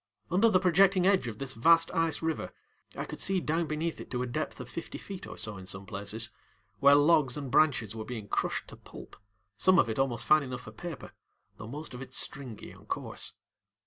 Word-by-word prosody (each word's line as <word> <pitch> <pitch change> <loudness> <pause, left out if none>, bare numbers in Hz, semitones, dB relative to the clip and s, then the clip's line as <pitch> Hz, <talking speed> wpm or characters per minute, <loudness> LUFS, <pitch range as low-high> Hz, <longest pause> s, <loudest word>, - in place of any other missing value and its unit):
Under 200 +6 +5
the 185 -4 +4
projecting 185 +1 +4
edge 190 -9 +3
of 110 -3 -5
this 135 0 -3
vast 165 +8 +4
ice 165 -1 0
river 160 -2 -2 0.4
I - - -3
could - - -6
see 195 -1 +2
down 165 0 -1
beneath 155 +1 -2
it - - -10
to 125 0 -2
a - - -1
depth 125 +5 -4
of 125 - -7
fifty 165 +7 -6
feet 195 -2 -8
or - - -9
so 110 -2 -1
in 95 0 -10
some 95 +1 -2
places, 105 +3 -3 0.5
where 140 +4 +7
logs 145 -3 +4
and 140 -3 -5
branches 125 -8 +3
were 110 - -4
being 110 -3 -6
crushed - - -1
to - - -10
pulp, - - -12 0.4
some 185 +7 +5
of 115 - +4
it 110 - -3
almost 125 -4 +1
fine 155 0 +6
enough 130 -2 -5
for 105 - -10
paper, 160 +6 -8 0.5
though - - -8
most 150 +5 -7
of 125 - -7
it 130 0 -9
stringy 130 -6 -2
and - - -16
coarse. - - -4
140 Hz, 215 wpm, -30 LUFS, 115-165 Hz, 0.5 s, where